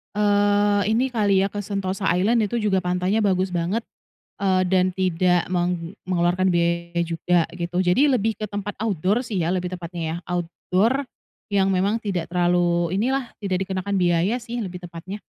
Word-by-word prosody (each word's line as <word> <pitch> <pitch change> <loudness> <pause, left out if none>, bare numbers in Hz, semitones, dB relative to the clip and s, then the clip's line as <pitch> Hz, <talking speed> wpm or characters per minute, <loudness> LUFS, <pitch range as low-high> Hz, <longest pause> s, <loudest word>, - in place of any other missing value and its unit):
eee, 205 0 +3
ini 255 +4 +2
kali 205 -5 +2
ya 195 - +1
ke 205 - -8
Sentosa 195 -1 -3
Island 215 +5 +2
itu 235 +3 -2
juga 205 -3 +2
pantainya 180 +2 0
bagus 190 -3 +1
banget, 180 +5 -1 0.5
eee, 190 -2 +1
dan 185 0 +2
tidak 180 -1 +1
meng 175 0 -2
mengeluarkan 180 +1 +1
biaya 170 0 0
juga 170 0 +1
gitu. 175 +1 -2
Jadi 190 +11 +3
lebih 225 -3 +1
ke - - -7
tempat 205 0 -4
outdoor 205 +3 +1
sih 210 -6 -3
ya 165 - 0
lebih 180 0 -3
tepatnya 175 -1 -6
ya, 160 0 -2
outdoor 185 +9 0 0.4
yang 195 -2 +2
memang 195 +3 +1
tidak 185 -5 -2
terlalu 175 -1 +1
inilah, 260 +2 -1
tidak 190 -2 -1
dikenakan 190 +1 -3
biaya 175 +3 +2
sih 240 0 -5
lebih 180 -4 -6
tepatnya. 175 +4 -8
185 Hz, 165 wpm, -23 LUFS, 175-205 Hz, 0.5 s, eee